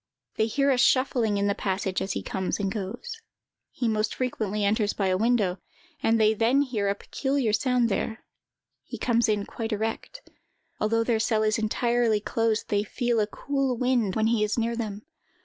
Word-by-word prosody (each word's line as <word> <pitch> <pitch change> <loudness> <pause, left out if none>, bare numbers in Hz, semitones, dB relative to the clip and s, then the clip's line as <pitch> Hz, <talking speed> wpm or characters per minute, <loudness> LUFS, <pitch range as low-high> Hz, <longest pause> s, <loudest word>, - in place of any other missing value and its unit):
They 220 - +1
hear 275 +4 +2
a 255 - +2
shuffling 240 -4 +3
in 200 - +1
the 200 - +2
passage 190 -1 -2
as 195 - -2
he - - -4
comes 190 -1 -2
and 195 -1 -1
goes. 220 - -6 0.5
He 240 - -2
most 215 -1 0
frequently 215 -5 -1
enters 205 0 +1
by 195 -2 0
the 185 - +2
window, 215 -5 +1 0.4
and 225 0 +2
they 215 0 +4
then 235 +6 +3
hear 225 -7 -2
a 200 - 0
peculiar 265 0 -1
sound 250 0 +2
there. 220 +1 -3 0.6
He - - -8
comes 235 -2 +1
in 205 -1 0
quite 225 -1 -5
erect. 225 - -4 0.5
Although 230 +2 +1
their 230 -1 +1
cell 220 -1 +1
is 215 +1 +1
entirely 235 0 +1
closed, 225 +1 -1
they 205 -1 +2
feel 240 +2 -1
a 210 - +1
cool 270 +2 -2
wind 240 -6 +1
when 220 - +1
he 225 -1 +2
is 210 +2 -1
near 230 0 0
them. 215 -2 -5
220 Hz, 185 wpm, -26 LUFS, 210-240 Hz, 0.6 s, they